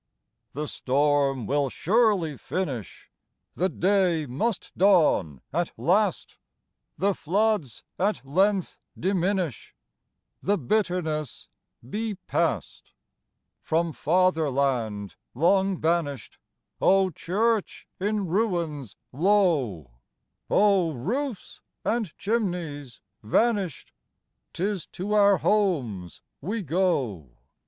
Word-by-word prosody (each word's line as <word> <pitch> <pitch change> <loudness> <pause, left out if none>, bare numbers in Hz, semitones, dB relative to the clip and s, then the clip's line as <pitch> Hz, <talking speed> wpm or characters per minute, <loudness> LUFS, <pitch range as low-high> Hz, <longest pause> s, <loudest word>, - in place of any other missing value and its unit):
The 150 +1 -3
storm 140 -2 +1
will 140 +3 +1
surely 190 - +2
finish, 135 - -5 0.4
The 185 +2 0
day 180 -3 +2
must 160 - -2
dawn 155 - +3
at 170 +2 0
last, 205 +5 +1 0.6
The 200 +1 +2
floods 195 - 0 0.2
at 200 -5 0
length 190 +6 +1 0.2
diminish, 185 - -1 0.7
The 205 +2 +1
bitterness 160 - -1 0.4
be 215 - -3
past. 190 - -2 0.7
From 165 0 0
Fatherland 140 - 0 0.2
long 190 +6 +3
banished 160 -4 -1 0.4
(Oh, 190 -1 +4
church 210 +6 -1
in 205 +1 0
ruins 170 - -1 0.2
low! 145 - +1 0.6
Oh, 195 -5 +3
roofs 230 - -4 0.2
and 225 -7 0
chimneys 175 - -3 0.2
vanished!) 195 - 0 0.6
'Tis 190 +1 -2
to 200 +4 -4
our 200 -2 +5
homes 135 - 0 0.2
we 205 +7 -3
go! 130 - -1
175 Hz, 85 wpm, -26 LUFS, 140-200 Hz, 0.7 s, our